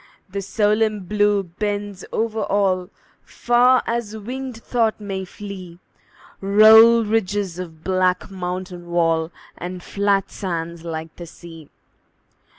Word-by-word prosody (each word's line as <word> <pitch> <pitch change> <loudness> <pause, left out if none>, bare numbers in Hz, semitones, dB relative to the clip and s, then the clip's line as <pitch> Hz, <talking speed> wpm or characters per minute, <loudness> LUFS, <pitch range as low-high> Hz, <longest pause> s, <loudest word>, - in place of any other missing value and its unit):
The 200 +1 -3
solemn 210 +1 +1
Blue 205 +1 +1
bends 205 +2 -4
over 225 -1 -1
all; 190 -2 +1 0.3
Far 245 +1 +3
as 230 -2 -3
winged 250 +3 -6
thought 230 -2 0
may 195 -2 -4
flee 185 -3 -9 0.6
Roll 220 +3 +7
ridges 205 -4 -1
of 165 -3 -8
black 185 0 0
mountain 180 -1 -5
wall, 165 -1 +1 0.2
And 180 0 -7
flat 200 -1 0
sands 170 -3 -4
like 160 -1 -6
the 175 - -8
sea. 165 -2 -13
195 Hz, 115 wpm, -21 LUFS, 180-215 Hz, 0.6 s, Roll